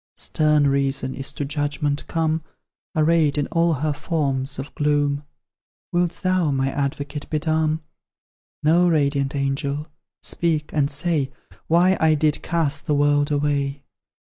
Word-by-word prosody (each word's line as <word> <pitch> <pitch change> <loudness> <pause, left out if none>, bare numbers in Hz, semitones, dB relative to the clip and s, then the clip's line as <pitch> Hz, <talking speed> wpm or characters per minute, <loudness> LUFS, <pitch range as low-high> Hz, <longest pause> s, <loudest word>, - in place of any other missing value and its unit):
Stern 150 -1 +2
Reason 135 -1 0
is 135 0 -4
to 145 - -3
judgment 145 0 -1
come, 160 -1 0 0.5
Arrayed 155 -2 +3
in 145 - +1
all 165 -1 +3
her 150 - +1
forms 140 -4 -2
of 135 +2 -7
gloom: 145 -1 +1 0.7
Wilt 175 -1 0
thou, 185 -3 +2
my 135 -1 0
advocate, 140 +1 -3
be 155 - 0
dumb? 155 0 0 0.8
No, 170 +4 +4
radiant 140 -3 +1
angel, 140 +1 -1 0.4
speak 160 -3 -1
and 145 -2 +2
say, 145 -2 0 0.4
Why 180 +3 +4
I 160 -1 +4
did 150 0 +1
cast 155 -4 -1
the 150 - +2
world 145 0 +3
away. 140 -1 0
145 Hz, 135 wpm, -23 LUFS, 140-160 Hz, 0.8 s, No